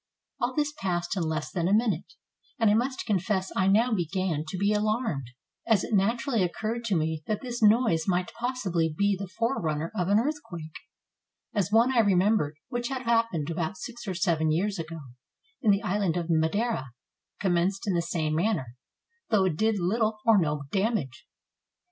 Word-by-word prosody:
All 250 0 -1
this 295 -1 0
passed 180 0 -1
in 185 - -1
less 160 -1 -2
than 170 -2 -1
a 195 - +2
minute, 215 -7 0 0.4
and 225 -3 +4
I - - +4
must 255 +4 0
confess 190 -2 0
I 190 - +2
now 225 +5 +4
began 175 -3 -1
to 185 - -4
be 200 +3 +2
alarmed, 210 - 0 0.4
as 225 -3 +3
it - - -4
naturally 230 +4 +2
occurred 220 +6 -2
to 205 -4 +1
me 160 -1 -1
that 215 - -1
this 245 -2 -5
noise 210 -7 +4
might 180 -1 0
possibly 195 -10 -1
be 200 0 +2
the 195 +1 -6
forerunner 170 - -1
of 180 -4 0
an 200 +1 +4
earthquake, 215 - -3 0.8
as 205 -2 0
one 235 +4 +4
I - - +5
remembered, 195 -6 +3
which 240 -1 -2
had 260 -1 -4
happened 230 - +1
about 165 +3 -2
six 240 +1 -8
or 190 - -2
seven 170 -4 +1
years 190 +4 0
ago, 165 0 -6 0.6
in 225 - +2
the 200 +2 +3
island 200 -4 0
of 170 -1 -2
Madeira, 160 - 0 0.5
commenced 190 +2 +1
in 195 - +2
the 170 - +2
same 160 -2 -1
manner, 160 - -1 0.5
though 205 -4 +3
it 180 -5 0
did 220 +4 +1
little 215 +4 0
or 225 -3 +6
no 150 -4 -1
damage. 195 - -1
195 Hz, 180 wpm, -27 LUFS, 170-225 Hz, 0.8 s, or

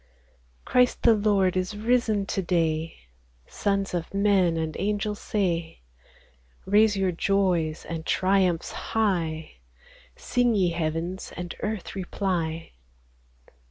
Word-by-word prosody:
Christ 250 -1 +2
the 230 - +7
Lord 205 -3 +2
is 185 +3 -2
risen 220 -2 +1
to 195 - -2
day," 165 -3 0 0.5
Sons 195 -2 -1
of 175 +2 -4
men, 195 -4 +3
and 160 -1 -2
angels, 210 0 -1
say: 170 - -2 0.8
Raise 205 +2 +4
your 190 -1 +1
joys 175 -3 0
and 165 -1 -5
triumphs 185 -2 +1
high; 165 - -2 0.6
Sing, 245 -2 +1
ye 185 -3 +3
heavens, 165 +3 -3
and 175 -1 -5
earth 210 -3 -4
reply. 175 -4 -2
190 Hz, 110 wpm, -26 LUFS, 165-205 Hz, 0.8 s, the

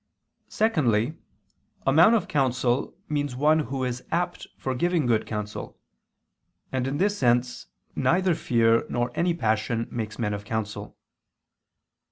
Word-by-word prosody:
Secondly, 145 - +1 0.7
a 135 - +3
man 170 +10 +7
of 210 - 0
counsel 130 -2 0
means 145 -3 -2
one 150 +4 +3
who 135 -3 -3
is 125 0 -3
apt 175 +1 -2
for 130 - -2
giving 170 +3 +1
good 115 -2 +1
counsel: 105 -1 -5 0.9
and 130 -1 -1
in 135 +2 -2
this 205 +5 +1
sense, 125 - +1 0.3
neither 185 +1 +2
fear 115 -5 +2
nor 120 0 -1
any 170 +3 +1
passion 110 -3 0
makes 110 -2 -4
men 105 -3 -1
of 100 0 -5
counsel. 105 0 -4
125 Hz, 135 wpm, -26 LUFS, 115-155 Hz, 0.9 s, man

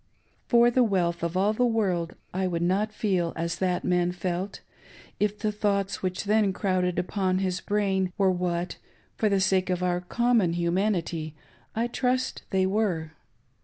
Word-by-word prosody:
For 240 0 +5
the 255 +1 +4
wealth 175 -6 0
of 170 +2 -1
all 200 +3 +3
the 250 - +1
world 185 -7 0 0.2
I 190 +1 0
would 170 -2 -1
not 200 +5 +1
feel 185 -6 0
as 170 +1 -2
that 180 -1 0
man 180 -1 +2
felt, 180 +2 -3 0.6
if 210 0 +1
the 215 0 -1
thoughts 200 -2 -1
which 185 -1 -2
then 210 -1 +2
crowded 185 -2 0
upon 185 0 0
his 185 -1 -1
brain 195 -3 0
were 195 -2 +4
what, 175 -1 -2 0.4
for 215 - +1
the 200 -1 +2
sake 190 -1 +2
of 180 0 0
our 180 -1 +1
common 230 -2 +2
humanity, 170 -3 -1 0.4
I 230 +2 +1
trust 255 +1 -1
they 190 -1 +2
were. 190 -6 0
190 Hz, 165 wpm, -27 LUFS, 180-210 Hz, 0.6 s, For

